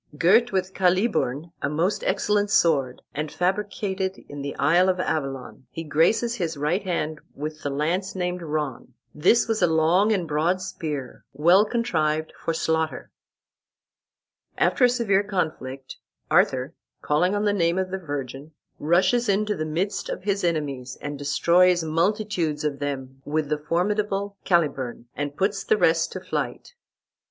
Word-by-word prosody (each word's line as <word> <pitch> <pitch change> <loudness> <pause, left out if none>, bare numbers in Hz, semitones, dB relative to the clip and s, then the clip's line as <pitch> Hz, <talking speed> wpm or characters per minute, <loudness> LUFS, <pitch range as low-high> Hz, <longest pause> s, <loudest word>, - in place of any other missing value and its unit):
Girt 220 +10 +4
with 190 -1 -1
Caliburn, 180 - +1
a 140 - 0
most 170 +7 0
excellent 205 +1 +1
sword, 140 -10 +2
and 150 +1 -3
fabricated 190 0 -1
in 145 0 -7
the 140 0 -5
isle 175 +5 +3
of 185 -1 0
Avalon, 135 -6 -3
he 165 - -6
graces 165 +10 +2
his 170 -8 -3
right 150 +7 0
hand 160 -5 -3
with 155 +1 -6
the 145 - -2
lance 165 +8 -1
named 180 -1 -2
Ron. 150 -6 -4 0.2
This 230 +12 +3
was 225 -1 0
a - - +5
long 165 +6 +3
and 185 -6 0
broad 160 +5 +1
spear, 155 -8 -5
well 175 +8 +5
contrived 160 -10 -1
for - - -3
slaughter." 160 -1 -1 1.5
After 250 - +3
a - - +5
severe 225 -6 +2
conflict, 155 -9 -4 0.3
Arthur, 130 +4 +2 0.3
calling 180 +7 +2
on 205 +1 0
the 205 - +2
name 170 -2 +1
of 185 -1 -1
the 190 - -2
Virgin, 145 -2 -6 0.3
rushes 185 +9 +2
into 210 +1 +1
the 155 - -3
midst 180 +7 -2
of - - -5
his 200 -1 -1
enemies, 140 -7 -2
and 145 0 -6
destroys 170 +5 +3
multitudes 170 -1 0
of 145 -2 -2
them 135 -2 -5
with 150 0 -1
the 150 -1 0
formidable 200 +5 -1
Caliburn, 140 -9 0
and 145 0 -4
puts 195 +1 0
the 215 - +2
rest 165 -3 +2
to - - -4
flight. - - -4
170 Hz, 150 wpm, -24 LUFS, 150-195 Hz, 1.5 s, a